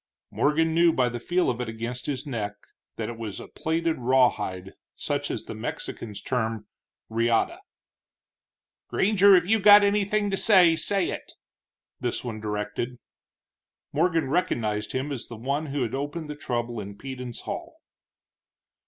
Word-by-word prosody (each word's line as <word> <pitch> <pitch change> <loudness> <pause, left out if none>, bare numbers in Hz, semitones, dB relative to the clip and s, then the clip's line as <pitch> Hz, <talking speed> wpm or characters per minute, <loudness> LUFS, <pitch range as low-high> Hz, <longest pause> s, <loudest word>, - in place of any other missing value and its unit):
Morgan 160 +2 +2
knew 170 +1 +5
by 125 -5 +2
the 120 0 -5
feel 175 +8 +1
of 125 0 -1
it 120 - -3
against 115 +2 -5
his 135 -3 -3
neck 110 -7 -3 0.4
that - - -3
it 115 -1 -7
was 110 -4 -5
a - - -9
platted 165 -1 -1
rawhide, 115 -7 +1 0.2
such - - -2
as - - -3
the - - -6
Mexicans 105 -3 -6
term 115 -4 -2 0.5
reata. 115 - +1 1.3
"Granger, 200 -1 +5
if 175 -2 +4
you 220 +4 +3
got 205 0 +9
anything 205 0 +1
to 195 - 0
say, 185 -7 +6
say 185 +3 +1
it," - - -7 0.7
this 120 - -2
one 110 -3 -5
directed. 105 +4 -3 1.0
Morgan 165 0 +2
recognized 115 -10 -1
him 135 +3 -2
as 130 -5 -5
the 120 - -8
one 140 +6 -2
who 140 -1 -1
had 115 0 -3
opened 145 +3 -4
the - - -6
trouble 120 -4 -3
in 100 0 -7
Peden's 125 -2 -7
hall. - - -6
130 Hz, 155 wpm, -26 LUFS, 115-170 Hz, 1.3 s, got